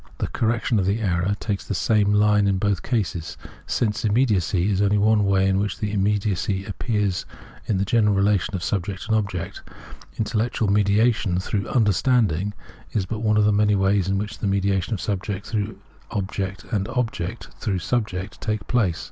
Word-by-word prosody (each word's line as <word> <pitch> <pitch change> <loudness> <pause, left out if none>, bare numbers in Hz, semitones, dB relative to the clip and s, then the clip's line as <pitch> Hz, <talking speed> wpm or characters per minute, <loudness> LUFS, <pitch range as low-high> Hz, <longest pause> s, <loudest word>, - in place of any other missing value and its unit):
The; - - -1
correction 115 0 0
of 95 - 0
the 100 +3 +1
error 95 -1 0
takes 100 -3 -3
the 100 - -2
same 105 +2 +2
line 105 -1 +4
in 100 -1 +2
both 100 -1 0
cases.; 95 -9 -2 0.3
Sense 105 -3 0
immediacy 105 -5 +2
is 95 0 +1
only 105 0 +3
one 105 0 +3
way 95 -1 +3
in 95 0 +2
which 100 -1 -2
immediacy 100 -1 0
appears 105 -2 -1 0.4
in 105 - +1
the 95 - 0
general 105 -1 +3
relation 100 +1 +1
of 90 - -4
subject 95 +3 -2
and 110 0 +1
object; 100 -5 -3 0.6
intellectual 110 0 0
mediation 105 -1 +2
through 95 +1 -2
' - - -7
understanding 105 -3 +2 0.2
' - - -23
is 100 -4 0
but 110 +3 -4
one 110 -1 +2
of 105 - +4
the 105 - +4
many 105 0 +3
ways 95 -1 +2
in 95 0 +1
which 105 +2 -4
the 105 - -1
mediation 100 +1 0
of - - -6
subject 100 0 -3
through 105 -2 -3 0.3
object 100 -1 -3
and 100 -3 0
object 115 -4 -3
through 100 -4 -1
subject 100 -3 -3
takes 105 -3 -2
place.. 105 -9 +1
100 Hz, 180 wpm, -23 LUFS, 95-110 Hz, 0.6 s, line